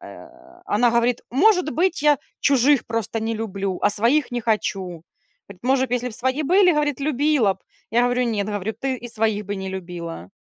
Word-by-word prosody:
а - - -14
она 235 +3 +2
говорит: 235 +1 +1
"Может 360 - +3
быть, 355 -1 0
я 295 -2 +4 0.2
чужих 275 -1 +3
просто 225 -1 -3
не 225 +1 -2
люблю, 195 -4 -3
а 205 - +4
своих 240 +8 +2
не 245 - -2
хочу". 195 -6 -2 0.5
Говорит: 200 0 -14
"Может, 260 0 +1
если 250 0 -1
бы 235 - -10
свои 260 +6 -1
были, 365 +4 +4
говорит, 295 -3 0
любила 285 -6 +2
б". 190 - -30 0.3
Я 235 +3 +3
говорю: 245 +1 +1
"Нет", 210 -4 -1
говорю, 205 0 -3
"Ты 265 -1 -1
и 240 0 -9
своих 220 -2 -1
бы 205 0 -3
не 190 0 -5
любила". 170 - -7
235 Hz, 190 wpm, -22 LUFS, 205-275 Hz, 0.5 s, я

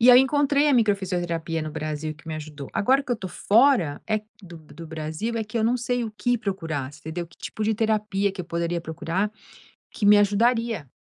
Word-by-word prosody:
E 245 +2 +8
aí 245 - +9
eu - - +6
encontrei 285 +1 +2
a 280 - +4
microfisioterapia 175 -7 0
no 155 - -4
Brasil 155 0 -4
que 155 +2 -20
me 155 - -3
ajudou. 150 -3 -8
Agora 265 +6 +3
que 265 - -9
eu - - 0
tô 190 - -6
fora 215 - +3
é 215 -1 +1 0.2
do 170 -2 -11
B 155 - -17
do 165 -1 -9
Brasil 160 +8 -4
é 225 - 0
que 215 +2 -4
eu 220 - +1
não 240 +2 +2
sei 245 0 -1
o 215 - -6
que 245 +2 +1
procurar, 160 -10 -3
entendeu 160 +3 -5
que 170 - -22
tipo 215 - -4
de 220 0 +2
terapia 210 -2 0
que 195 - -6
eu 180 - -5
poderia 170 0 -1
procurar 170 +5 -2 0.6
que 205 - -4
me 205 0 +8
ajudaria. 225 - +1
200 Hz, 225 wpm, -25 LUFS, 160-230 Hz, 0.6 s, aí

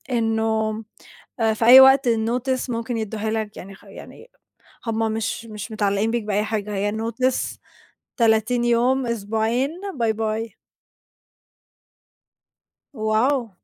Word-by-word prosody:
إنُّه 220 -1 0 0.6
آآ، 220 -1 +2
في 225 +1 -1
أي 255 +3 +10
وقت 265 0 +6
الNotice 245 +4 -1
ممكن 230 0 -3
يدوها 220 0 -3
لك، 220 -2 -4
يعني 195 +2 -10
خ - - -21
يعني - - -13 0.6
هُم 225 0 0
مش 225 +1 -3
مش 215 0 -8
متعلقين 205 +1 0
بيك 235 -2 -1
بأي 210 0 0
حاجة، 210 -1 -3
هي 205 +1 -1
Notice 230 +4 -2 0.6
30 230 +1 +2
يوم، 245 +2 +2
أسبوعين 225 +4 -1 0.3
باي 225 -2 +1
باي. 220 +1 -4 2.5
واو! 235 +2 +1
225 Hz, 120 wpm, -22 LUFS, 215-240 Hz, 2.5 s, أي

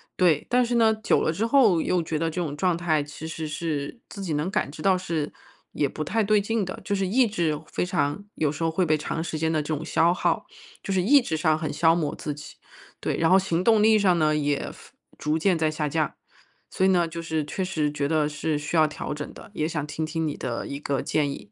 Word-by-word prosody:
对， 170 -5 +3
但 250 +1 +3
是 240 0 -1
呢， 225 -2 +5
久 220 0 +1
了 160 - +1
之 200 - -2
后 230 - +5
又 180 +1 +1
觉 160 -1 -2
得 165 +1 0
这 165 +3 -4
种 155 -5 -2
状 175 +2 +1
态， 165 -3 +1
其 150 +2 -8
实 160 -1 -5
是 150 - -3
自 200 - -9
己 175 -5 -2
能 150 +4 -1
感 140 - -1
觉 155 +1 -9
到 190 -1 +4
是 165 -5 -3 0.4
也 145 - 0
不 155 - -4
太 220 +8 0
对 210 +1 +3
劲 220 +1 -1
的。 185 0 -5
就 205 - -1
是 195 -1 0
意 245 +7 +4
志 170 -9 -1
非 - - -2
常 175 -1 -1
有 150 -2 +1
时 155 - -8
候 165 - +2
会 175 +3 +1
被 155 -1 +3
长 155 +2 -3
时 160 -2 -4
间 160 0 +1
的 160 - +1
这 155 +1 -2
种 150 - -5
消 170 +1 +3
耗， - - 0 0.4
就 195 - -2
是 185 - +2
意 275 +10 +6
志 240 -11 -2
上 155 0 +2
很 155 -1 -3
消 165 0 +4
磨 155 -4 -1
自 150 - -4
己。 145 - -10 0.5
对， - - -2
然 165 - +2
后 190 - +7
行 180 -2 -1
动 220 -1 +5
力 220 0 +6
上 185 -4 +3
呢， 155 -1 +3
也 145 -1 -1
服 - - -16 0.2
逐 155 +2 0
渐 180 +1 +2
在 160 -1 +1
下 155 -1 -2
降。 155 0 0 0.6
所 - - -1
以 190 - +5
呢， 175 -2 +3
就 165 0 -6
是 160 -2 -2
确 190 +6 -3
实 160 -5 -1
觉 145 -1 -1
得 155 -1 +2
是 150 +1 -2
需 150 +3 -4
要 155 -1 +5
调 150 - -5
整 150 0 -6
的， 225 - -13
也 155 -5 -1
想 150 -3 -3
听 150 +1 -4
听 160 0 -2
你 150 - -3
的 120 -2 -4
一 140 - -5
个 140 -2 -2
建 150 -2 +1
议。 105 -7 -8
160 Hz, 280 characters per minute, -25 LUFS, 150-185 Hz, 0.6 s, 后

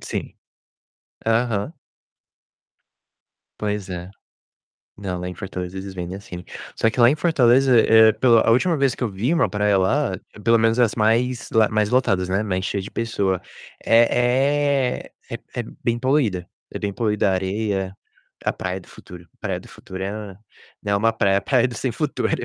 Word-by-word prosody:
Sim. - - -5 0.9
Aham. 115 +2 0 1.9
Pois 105 -2 -3
é. 90 0 -6 0.9
Não, 95 -3 -4
lá 90 - -4
em 90 - -6
Fortaleza 90 -1 -6
eles 95 0 -7
vendem 90 0 -5
assim. 90 -3 -9 0.3
Só 115 - +2
que - - -9
lá 120 - +8
em 135 - +3
Fortaleza, 130 -6 +4
eh, 110 0 +6
pela 115 0 +4
a - - +4
última 160 +9 +3
vez 135 -3 +1
que - - -2
eu - - 0
vi 105 +10 -1
uma 170 - +2
praia 105 -1 +1
lá, 95 0 +1 0.2
pelo 115 0 +4
menos 115 +1 +2
as 115 -3 +3
mais 120 +3 +1
lá 110 -2 +4
mais 105 -1 +1
lotadas, 95 -8 +1
né, 95 +3 0
mais 95 -3 -2
cheia 100 - -2
de 100 - -8
pessoa, 100 -5 -1 0.4
é 130 +3 +2 0.2
é - - -4 0.2
é - - 0
é - - -2 0.2
bem 120 0 +1
poluída. 120 - 0 0.2
É - - -4
bem 100 -1 -3
poluída 105 -2 +1
a - - +1
areia 95 0 -2 0.5
a - - +1
Praia 95 0 -4
do 90 - -18
Futuro. 85 -1 -13
Praia - - -2
do - - -15
Futuro 95 0 -9
é, 100 -1 -6 0.5
né, 100 -1 +1
uma 115 +3 +2
praia 100 -3 +2
praia 130 -2 +2
do 120 - -8
sem 125 +3 -2
futuro. 150 +3 -2
110 Hz, 175 wpm, -22 LUFS, 95-125 Hz, 1.9 s, lá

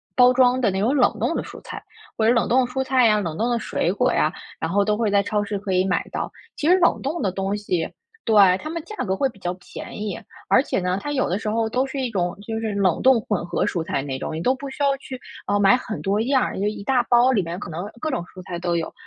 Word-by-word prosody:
包 250 0 +7
装 250 0 +4
的 230 - +3
那 190 - -2
种 235 +8 +2
冷 260 - +3
冻 - - 0
的 - - -1
蔬 - - -10
菜， - - -8 0.4
或 220 - +2
者 235 - +5
冷 230 - +2
冻 255 +2 +4
的 - - -6
蔬 265 +1 -1
菜 260 -1 +3
呀、 210 -1 +4
冷 165 -5 -3
冻 230 +2 0
的 240 - +1
水 175 - -1
果 250 +6 +1
呀， 155 - +2 0.3
然 160 - -2
后 200 +2 +2
都 210 0 +2
会 225 -2 +1
在 200 0 +3
超 210 0 0
市 205 0 -3
可 195 -1 -4
以 185 0 +3
买 180 - 0
到。 - - -3 0.2
其 300 - -2
实 365 - +6
冷 345 - +3
冻 300 +6 -2
的 195 - 0
东 195 +2 -2
西 185 -5 -1 0.4
对， 220 - +2 0.3
它 310 - -6
们 335 +1 -4
价 425 - -8
格 190 -2 0
会 275 - +2
比 215 - -17
较 180 -1 -2
便 185 +3 -9
宜， 210 -4 -3 0.3
而 260 - +4
且 - - -1
呢， 180 0 -1
它 290 - -4
有 275 -3 +1
的 180 - 0
时 215 - -3
候 225 +1 0
都 255 +4 +1
是 270 +1 -5
一 255 -2 -1
种， 180 -5 -2
就 225 -1 -2
是 220 -2 -2
冷 195 -4 +1
冻 260 -2 +5
混 210 -5 -2
合 175 - -1
蔬 170 - -1
菜 140 - -2
那 135 -1 -4
种， 145 - -5
你 160 - -3
都 255 +8 +2
不 275 +1 -7
需 265 - -9
要 280 -1 +3
去， 265 -1 -8 0.3
啊， 205 0 +1
买 200 +4 +6
很 245 -3 -5
多 200 +2 0
样 260 +3 +2
儿， - - -2
就 200 - -1
一 210 -1 -3
大 255 -1 +3
包 245 +2 +5
里 210 - +3
面 170 +2 -5
可 205 - -7
能 170 +3 -5
各 310 - -2
种 255 - -2
蔬 185 +1 -12
菜 175 0 -5
都 175 -1 0
有。 165 - -4
215 Hz, 315 characters per minute, -23 LUFS, 185-255 Hz, 0.4 s, 包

